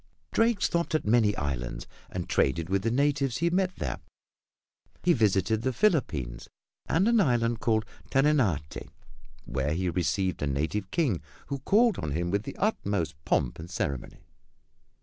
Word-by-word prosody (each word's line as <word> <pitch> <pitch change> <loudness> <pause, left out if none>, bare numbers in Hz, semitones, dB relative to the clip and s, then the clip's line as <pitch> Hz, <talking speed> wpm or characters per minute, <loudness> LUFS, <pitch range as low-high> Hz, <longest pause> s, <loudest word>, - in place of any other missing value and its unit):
Drake 225 -2 +2
stopped 170 -1 +1
at 155 - 0
many 105 -1 +3
islands - - -3 0.2
and - - -4
traded 80 +5 +1
with 95 0 +1
the 115 - 0
natives 140 0 +1
he 170 +2 +1
met 185 0 +1
there. - - -4 1.0
He 175 - +5
visited 110 - +2
the 130 - 0
Philippines 105 - 0 0.4
and 185 +6 +2
an 235 -1 +4
island 120 - +2
called 110 -2 +1 0.2
Terenate, 130 - +1 0.6
where 70 +4 -1
he 90 0 0
received 90 +1 0
a 75 - 0
native 80 +8 -1
king 140 - 0 0.3
who 140 -1 -2
called 215 - +3
on 75 -3 -3
him 85 +3 -1
with 100 +2 0
the - - -7
utmost 100 - 0
pomp 60 - 0
and 85 +2 -8
ceremony. 70 -7 -4
110 Hz, 150 wpm, -28 LUFS, -, 1.0 s, He